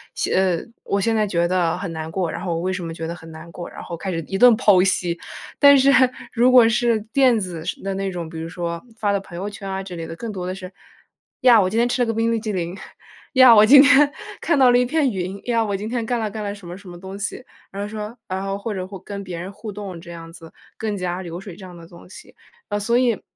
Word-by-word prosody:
写 -, -, -1 dB
呃， 185 Hz, -3 st, +1 dB, 0.2 s
我 200 Hz, -, 0 dB
现 225 Hz, +3 st, +1 dB
在 215 Hz, -2 st, +1 dB
觉 170 Hz, -2 st, +1 dB
得 175 Hz, -2 st, +1 dB
很 195 Hz, -, -5 dB
难 160 Hz, -1 st, -5 dB
过， 175 Hz, -1 st, -2 dB
然 -, -, -6 dB
后 175 Hz, -3 st, -2 dB
我 165 Hz, -, -2 dB
为 185 Hz, +2 st, -1 dB
什 185 Hz, -2 st, -4 dB
么 165 Hz, -, -5 dB
觉 165 Hz, -, -6 dB
得 165 Hz, -, -4 dB
很 165 Hz, -1 st, -12 dB
难 160 Hz, +2 st, -11 dB
过， 175 Hz, +1 st, -8 dB
然 -, -, -10 dB
后 170 Hz, -, -7 dB
开 190 Hz, +3 st, -4 dB
始 165 Hz, -, -2 dB
一 195 Hz, -, -1 dB
顿 245 Hz, +1 st, +7 dB
剖 200 Hz, -4 st, +4 dB
析。 175 Hz, -3 st, 0 dB, 0.4 s
但 280 Hz, -1 st, +8 dB
是 270 Hz, +1 st, +5 dB, 0.4 s
如 245 Hz, +1 st, +3 dB
果 235 Hz, -3 st, +7 dB
是 235 Hz, -1 st, +1 dB
电 260 Hz, -4 st, +4 dB
子 175 Hz, -5 st, -5 dB
式 -, -, -4 dB
的 195 Hz, 0 st, -2 dB
那 195 Hz, 0 st, -2 dB
种， 175 Hz, -3 st, -5 dB
比 160 Hz, -, -8 dB
如 165 Hz, -, -5 dB
说 170 Hz, 0 st, -4 dB, 0.2 s
发 205 Hz, -2 st, 0 dB
到 200 Hz, -, +1 dB
朋 175 Hz, -3 st, -11 dB
友 200 Hz, +3 st, -4 dB
圈 200 Hz, -1 st, -8 dB
啊 190 Hz, 0 st, -3 dB
之 180 Hz, -2 st, -8 dB
类 165 Hz, -1 st, -6 dB
的， 165 Hz, -, -7 dB
更 230 Hz, +4 st, -6 dB
多 185 Hz, -3 st, -5 dB
的 185 Hz, -, -3 dB
是， 185 Hz, 0 st, -9 dB, 0.7 s
“呀， 240 Hz, -3 st, +7 dB
我 185 Hz, -, +1 dB
今 220 Hz, -, -3 dB
天 240 Hz, +1 st, +3 dB
吃 245 Hz, -, -1 dB
了 -, -, +3 dB
个 -, -, +1 dB
冰 225 Hz, +1 st, 0 dB
淇 215 Hz, -1 st, -3 dB
淋”， 175 Hz, -2 st, -3 dB, 0.6 s
“呀， 255 Hz, -3 st, +8 dB
我 210 Hz, -, +8 dB
今 275 Hz, +5 st, +8 dB
天 285 Hz, 0 st, +6 dB, 0.3 s
看 335 Hz, -, +1 dB
到 255 Hz, -2 st, +6 dB
了 245 Hz, -, +5 dB
一 -, -, +3 dB
片 280 Hz, 0 st, +1 dB
云”， 190 Hz, 0 st, -4 dB
“呀， 230 Hz, -2 st, +1 dB
我 205 Hz, -2 st, -2 dB
今 210 Hz, +2 st, -5 dB
天 240 Hz, -1 st, -2 dB
干 245 Hz, 0 st, 0 dB
了 220 Hz, -1 st, -2 dB
干 215 Hz, 0 st, -5 dB
了 200 Hz, -, -3 dB
什 200 Hz, -4 st, -13 dB
么 175 Hz, -, -7 dB
什 195 Hz, -2 st, -13 dB
么 175 Hz, 0 st, -10 dB
东 190 Hz, +1 st, -8 dB
西”， 225 Hz, +5 st, -5 dB, 0.3 s
然 200 Hz, +1 st, -6 dB
后 205 Hz, -, -3 dB
说 215 Hz, +2 st, -7 dB
然 190 Hz, +1 st, -3 dB
后 195 Hz, 0 st, -3 dB
或 210 Hz, +2 st, -4 dB
者 185 Hz, -2 st, -4 dB
会 195 Hz, -, -8 dB
跟 200 Hz, -1 st, -7 dB
别 180 Hz, -3 st, -6 dB
人 180 Hz, +3 st, -6 dB
互 210 Hz, +1 st, -8 dB
动 195 Hz, -4 st, -7 dB
这 170 Hz, -, -11 dB
样 165 Hz, -1 st, -10 dB
子， 165 Hz, -2 st, -13 dB, 0.3 s
更 215 Hz, -2 st, -3 dB
加 180 Hz, 0 st, -3 dB
流 170 Hz, -1 st, -7 dB
水 195 Hz, -3 st, -10 dB
这 195 Hz, -, -13 dB
样 180 Hz, -, -11 dB
的 165 Hz, -1 st, -13 dB
东 170 Hz, +1 st, -15 dB
西。 -, -, -14 dB, 0.3 s
呃， 205 Hz, -, -1 dB
所 235 Hz, +4 st, +1 dB
以 245 Hz, -4 st, +1 dB
195 Hz, 305 characters per minute, -21 LUFS, 175-225 Hz, 0.7 s, 但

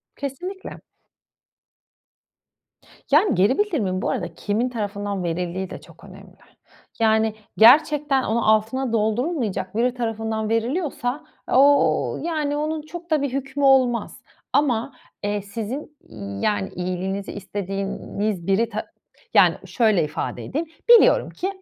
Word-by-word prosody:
Kesinlikle. 360 Hz, +8 st, -6 dB, 2.3 s
Yani, 335 Hz, +8 st, +4 dB
geri 200 Hz, +8 st, +3 dB
bildirimin 225 Hz, -, 0 dB
bu -, -, -1 dB
arada 175 Hz, -1 st, -3 dB
kimin 215 Hz, +7 st, -1 dB
tarafından 205 Hz, -4 st, -3 dB
verildiği 175 Hz, +2 st, -3 dB
de -, -, -8 dB
çok -, -, -18 dB
önemli. -, -, -14 dB, 0.6 s
Yani, 220 Hz, -1 st, +2 dB, 0.2 s
gerçekten 285 Hz, +3 st, +5 dB
onu, 230 Hz, +1 st, 0 dB
altına 225 Hz, +3 st, +1 dB
doldurulmayacak 220 Hz, -, -1 dB
biri 245 Hz, +2 st, +1 dB
tarafından 225 Hz, -2 st, -3 dB
veriliyorsa, 255 Hz, +3 st, -1 dB, 0.3 s
o 285 Hz, +2 st, +4 dB
ııı, -, -, -6 dB
yani 300 Hz, -3 st, -1 dB
onun 310 Hz, +1 st, -2 dB
çok 340 Hz, +3 st, -10 dB
da 305 Hz, -2 st, +3 dB
bir 280 Hz, -3 st, -2 dB
hükmü 275 Hz, +1 st, -3 dB
olmaz. 260 Hz, -3 st, +3 dB, 0.3 s
Ama, 260 Hz, -2 st, +1 dB, 0.3 s
eee, 205 Hz, 0 st, -1 dB
sizin, 230 Hz, +9 st, -6 dB
iii, 100 Hz, -3 st, -7 dB
yani, 205 Hz, -2 st, 0 dB
iyiliğinizi 185 Hz, +2 st, -3 dB
istediğiniz 195 Hz, -1 st, -4 dB
biri 210 Hz, +4 st, +2 dB
ta 215 Hz, -1 st, -4 dB, 0.5 s
yani, -, -, +6 dB
şöyle 215 Hz, -8 st, +2 dB
ifade 150 Hz, +1 st, -4 dB
edeyim: 315 Hz, +5 st, -3 dB, 0.2 s
Biliyorum 475 Hz, -1 st, +6 dB
ki, 370 Hz, -, -4 dB
225 Hz, 120 wpm, -23 LUFS, 200-285 Hz, 2.3 s, yani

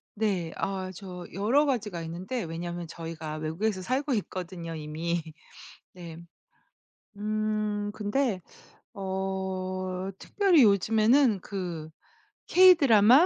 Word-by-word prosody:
네. 195 Hz, -6 st, 0 dB
아 190 Hz, -1 st, -2 dB
저 180 Hz, -2 st, -8 dB
여러 230 Hz, -, +3 dB
가지가 215 Hz, -, -1 dB
있는데 185 Hz, +9 st, -4 dB
왜냐하면 170 Hz, +1 st, -5 dB
저희가 160 Hz, -2 st, -6 dB
외국에서 185 Hz, +6 st, -1 dB
살고 265 Hz, +8 st, 0 dB
있거든요, 180 Hz, -4 st, -4 dB
이미. 160 Hz, +2 st, -2 dB, 0.7 s
네. 170 Hz, -3 st, -9 dB, 1.0 s
음 215 Hz, 0 st, -1 dB
근데 215 Hz, 0 st, 0 dB, 0.5 s
어. 190 Hz, -1 st, -3 dB
특별히 385 Hz, -7 st, +3 dB
요즘에는 220 Hz, +3 st, +4 dB
그 175 Hz, -6 st, -5 dB, 0.6 s
케이 370 Hz, 0 st, +8 dB
드라마? 255 Hz, -, +6 dB
190 Hz, 215 characters per minute, -28 LUFS, 175-220 Hz, 1.0 s, 케이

